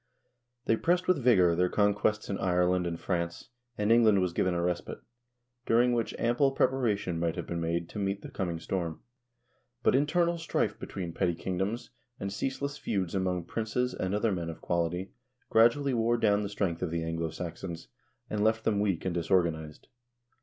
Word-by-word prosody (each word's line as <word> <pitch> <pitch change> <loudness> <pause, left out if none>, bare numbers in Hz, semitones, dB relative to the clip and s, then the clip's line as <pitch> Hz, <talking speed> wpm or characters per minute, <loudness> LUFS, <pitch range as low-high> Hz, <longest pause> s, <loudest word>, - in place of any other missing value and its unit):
They 115 - +3
pressed 175 +5 +1
with 180 -6 +3
vigor 95 -9 +5
their 90 +1 +2
conquests 105 +2 +1
in 100 - -3
Ireland 90 -1 +2
and 85 -1 -4
France, 85 +3 -3 0.3
and 105 +1 +1
England 110 -4 +6
was 90 -2 0
given 90 0 +1
a 85 - 0
respite, 90 0 -2 0.7
during 120 +2 +4
which 115 -2 -1
ample 120 +4 +2
preparation 110 -11 +1
might 85 -1 0
have - - -4
been 85 -1 -3
made 85 0 -1
to 105 - -6
meet 100 0 -2
the - - -8
coming 85 -3 -3
storm. 85 -1 -3 0.8
But - - +4
internal 170 +5 +2
strife 165 - -1
between 85 -3 -5
petty 85 -2 0
kingdoms, 95 +7 -3 0.3
and 100 0 -4
ceaseless 140 +5 -3
feuds 95 -4 -2
among 90 -2 0
princes 115 +6 -2
and 95 +2 -2
other 105 +1 +1
men 85 -3 -2
of 80 - -7
quality 85 +2 -1 0.4
gradually 125 +5 +4
wore 120 0 +2
down 105 -2 +3
the 100 - -3
strength 95 -5 -2
of 90 - -1
the 85 0 -2
Anglo 80 0 -2
Saxons, 85 0 -6 0.4
and 105 -1 -1
left 110 0 +2
them 105 -2 +1
weak 100 -5 0
and 95 - 0
disorganized. 85 -3 0
95 Hz, 175 wpm, -29 LUFS, 85-115 Hz, 0.8 s, England